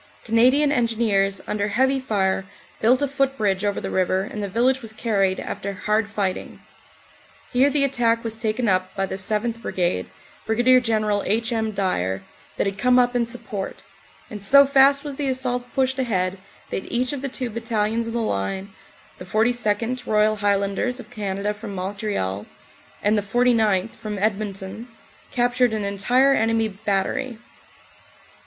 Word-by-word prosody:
Canadian 255 +6 +4
Engineers 220 -6 +1
under 205 -1 -1
heavy 265 +6 +2
fire 195 -6 0 0.3
built 250 +5 +3
a - - +2
footbridge 260 -8 0
over 205 -1 0
the - - -5
river 185 0 +1
and 210 +1 -6
the 200 - -3
village 255 +6 +2
was 225 -2 -5
carried 200 -4 0
after 200 0 -4
hard 210 +3 0
fighting. 200 -3 -3 0.9
Here 260 +3 +4
the 285 0 +2
attack 235 -4 +1
was 225 -1 -3
taken 225 +1 -1
up 185 -1 0
by 195 -1 0
the - - -6
7th. 215 +4 -2
Brigade, 180 -5 -1 0.4
Brig. 250 +3 +4
General 215 -3 +1
H. 225 +3 0
M. 220 -1 0
Dyer, 95 - -1 0.3
that - - +1
had 195 0 -3
come 250 0 +4
up 245 0 +3
in 235 -1 +1
support, 230 -5 -6 0.4
and 210 -4 -8
so 280 +6 +7
fast 275 +1 +5
was 285 -3 -6
the 285 - -1
assault 250 -1 -2
pushed 265 0 +1
ahead 190 -6 0 0.3
that - - -4
each 250 +3 0
of 280 - -4
the 275 - -3
two 250 -2 -4
battalions 225 0 -1
in 230 - -4
the 235 - 0
line, 190 - -2 0.5
the 180 - -8
42nd., 230 +3 0
Royal 215 0 +3
Highlanders 205 +4 0
of - - -11
Canada 200 0 -2
from 210 -1 -8
Montreal, 185 - -3 0.6
and 210 +1 +3
the 210 - +2
49th., 220 -2 +2
from 210 -1 -6
Edmonton, 200 +1 -3 0.4
captured 245 -1 +2
an 215 -1 -1
entire 245 +8 +3
enemy 225 -2 +1
bat 195 -1 -1
tery. 260 -4 -4
220 Hz, 160 wpm, -23 LUFS, 200-245 Hz, 0.9 s, so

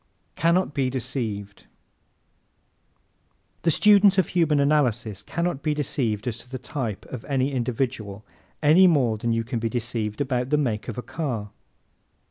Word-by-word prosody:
Can 170 +1 +2
Not 185 -4 0
be 135 -3 0
Deceived 115 -6 -4 1.9
¶ - - -39
The 170 - +2
student 200 +3 +5
of 190 - +2
Human 160 -4 +2
Analysis 125 -8 +1
cannot 170 +4 -2
be 150 0 0
deceived 125 -6 -2
as 115 -1 -3
to 125 - -12
the 130 - -5
type 125 -4 -4
of 125 - -5
any 135 -1 0
individual 120 -5 -3 0.4
any 165 +6 +7
more 125 -10 +2
than 115 +2 -1
you 115 0 0
can 115 +1 -3
be 115 0 -1
deceived 115 -2 -3
about 130 -2 -1
the 150 - +3
make 115 -8 -1
of 115 - -5
a 125 - -4
car. 120 -11 -4
130 Hz, 160 wpm, -24 LUFS, 115-150 Hz, 1.9 s, any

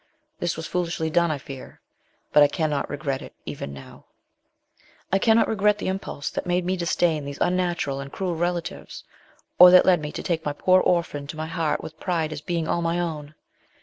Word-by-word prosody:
This 175 -2 -2
was 160 - -5
foolishly 170 -2 -2
done, 170 +2 +3
I 155 - -1
fear; 135 -1 -10 0.5
but 150 - +7
I 145 - +8
cannot 150 -1 -1
regret 140 -2 -3
it, - - -11
even 70 - -6
now. 70 -1 -12 1.1
I 195 - +4
cannot 225 +2 +4
regret 210 -1 +2
the 195 - -3
impulse 190 -6 -4
that - - -4
made 175 0 +1
me 185 +1 0
disdain 170 -3 0
these 140 0 -6
unnatural 175 -6 0
and 140 0 -7
cruel 185 -3 -2
relatives, 175 0 -3 0.6
or 180 0 +11
that 180 0 +7
led 180 -4 +4
me 150 0 -5
to - - -5
take 165 -2 -1
my 145 - -2
poor 185 +5 +4
orphan 165 -5 0
to 155 - -7
my 155 - -3
heart 165 -2 -1
with 160 0 -9
pride 165 -4 -1
as 150 - -7
being 165 0 -2
all 170 - 0
my 170 +1 0
own. 155 -3 -4
165 Hz, 200 wpm, -24 LUFS, 150-180 Hz, 1.1 s, or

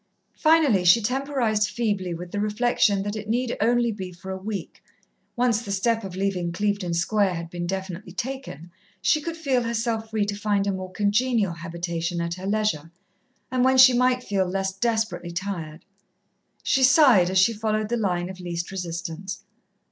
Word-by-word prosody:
Finally 310 - +4
she 180 +6 +6
temporized 240 -3 0
feebly 205 -6 -1
with 175 +1 -6
the 205 - -3
reflection 210 -2 +1
that 205 +1 -3
it 215 0 -6
need 245 +1 0
only 240 +1 +2
be 190 -4 -6
for 185 +2 -9
a - - -3
week 200 +2 -6 0.5
once 240 -2 +2
the 205 -4 -6
step 225 +3 +1
of 190 -2 -7
leaving 185 -3 -1
Clevedon 200 -1 -1
Square 190 +2 +1
had 165 0 -6
been 175 -1 -4
definitely 190 0 -5
taken, 230 - -6 0.3
she 305 +11 +2
could 330 +2 -5
feel 275 -6 +1
herself 230 -1 -2
free 215 -2 0
to 205 0 -3
find 205 -1 0
a 200 - +1
more 185 -1 -5
congenial 210 0 +1
habitation 170 0 -4
at 170 0 -2
her 185 +2 -6
leisure, 205 -7 0 0.6
and 255 -1 +1
when 260 0 +4
she 260 0 +9
might 250 0 +2
feel 195 -2 0
less 190 +1 -2
desperately 220 -3 -1
tired. 170 -3 -5 0.8
She 270 - +2
sighed, 255 - +6
as 190 - 0
she 190 +5 +5
followed 215 0 -1
the 240 - 0
line 180 -5 -1
of 185 0 -9
least 175 -1 -4
resistance. 175 +1 -5
205 Hz, 175 wpm, -24 LUFS, 180-235 Hz, 0.8 s, she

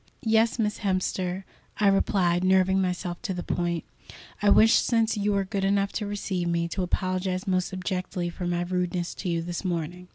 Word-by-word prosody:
"Yes, 225 +1 +3
Miss 210 -2 -1
Hemster," 185 -1 -1 0.3
I 210 - +1
replied, 185 -3 +3
nerving 190 0 +4
myself 180 -1 -2
to 195 -6 -3
the 175 - -4
point. 170 -1 -1 0.6
"I 205 - +4
wish, 220 +2 +6
since 230 -1 +2
you 205 0 0
are 200 - +2
good 195 +1 -3
enough 200 0 +2
to 210 - -3
receive 195 -3 -2
me, 170 0 0
to 190 - -3
apologize 185 0 -1
most 185 -1 0
abjectly 185 -1 -3
for 175 +1 -5
my 175 0 0
rudeness 180 -1 -2
to 185 - -5
you 165 -1 0
this 175 +2 -4
morning." 175 0 -3
185 Hz, 185 wpm, -26 LUFS, 175-200 Hz, 0.6 s, wish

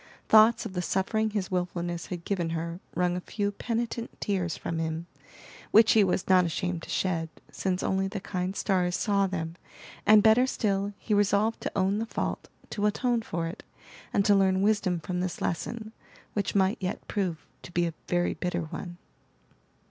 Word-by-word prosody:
Thoughts 220 +2 +6
of 205 - -5
the 180 - -1
suffering 215 +5 0
his 205 -3 -3
wilfulness 175 -1 -2
had 175 -2 -6
given 180 -5 -1
her 170 +2 -4 0.2
wrung 180 +1 +1
a 180 - -3
few 205 +2 -2
penitent 235 +2 -3
tears 185 -4 -1
from 165 - -3
him, 160 +1 -2 0.6
which 220 +1 +6
he 220 - +6
was 185 -1 0
not 185 -1 +6
ashamed 175 0 -2
to - - -11
shed, 165 -3 0 0.2
since 185 -1 -1
only 190 0 +1
the 200 +1 -4
kind 185 0 -3
stars 180 -3 +1
saw 200 -1 +2
them, 165 -3 -4 0.5
and 210 0 +7
better 225 +4 +6
still, 200 -4 0
he 215 - -2
resolved 205 +2 +2
to - - -3
own 195 +2 +2
the 225 - -2
fault, - - -3 0.2
to 210 0 +1
atone 240 +2 +1
for 170 -6 -3
it, 165 - -6 0.5
and 200 - +2
to 205 - +6
learn 190 -1 +3
wisdom 200 -4 +2
from 180 +2 -3
this 180 -1 -3
lesson, 215 +5 -3 0.4
which 205 -1 -1
might 195 +3 +3
yet 185 0 -4
prove 185 -6 -2 0.2
to - - -11
be 175 0 +1
a 165 - -2
very 175 0 +1
bitter 180 -1 -2
one. 175 +2 -7
190 Hz, 180 wpm, -28 LUFS, 175-210 Hz, 0.6 s, and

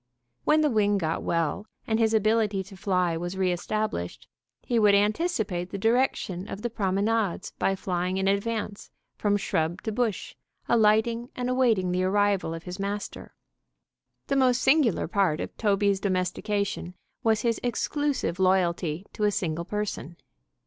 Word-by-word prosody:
When 310 +1 +4
the 300 - +3
wing 205 -2 +2
got 165 -3 -1
well, 170 +5 -1 0.2
and 220 0 0
his 220 -1 +3
ability 215 -2 +2
to 195 +1 -13
fly 180 -3 0
was 175 +3 -4
re 185 -1 +2
established, 180 - -3 0.4
he 240 -2 +1
would 205 -2 +5
anticipate 205 - 0
the 200 - -5
direction 215 -4 0
of 210 - -7
the 240 - -2
promenades 200 -1 0
by 195 - +2
flying 185 0 -2
in 190 0 0
advance 205 +1 -2 0.3
from 205 -1 +1
shrub 165 -3 -1
to 220 - -2
bush, 220 -3 -2 0.3
alighting 230 +2 +3
and 250 0 -2
awaiting 225 -8 +2
the 180 +1 +1
arrival 200 -3 +1
of 165 - -8
his 180 +1 -7
master. 200 +1 -5 0.9
The 275 - -1
most 260 -2 +3
singular 270 - +3
part 180 -4 +1
of - - -5
Toby's 200 -2 +2
domestication 195 0 -2 0.3
was 220 -2 +2
his 230 -1 0
exclusive 260 - -1
loyalty 180 -2 +1
to 210 - 0
a 205 - +3
single 170 -3 -2
person. 205 -5 -4
200 Hz, 150 wpm, -27 LUFS, 185-225 Hz, 0.9 s, would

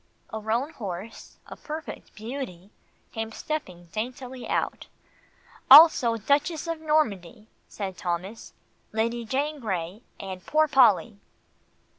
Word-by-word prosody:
A 220 - -3
roan 230 +7 -1
horse 200 - -8
a - - -10
perfect 310 0 -8
beauty 215 -5 -7 0.4
came 225 0 -4
stepping 190 - -5
daintily 250 +3 -5
out. - - -2 0.8
"Also 270 -6 +9
Duchess 290 +8 0
of 330 -1 -4
Normandy," 225 - 0 0.2
said 190 -3 -6
Thomas, 185 +4 -4 0.4
"Lady 230 +2 -1
Jane 285 +6 -2
Grey, 190 -3 -4 0.2
and 185 -2 -7
Poor 310 - +2
Polly." 235 -6 +4
230 Hz, 110 wpm, -26 LUFS, 200-280 Hz, 0.8 s, Also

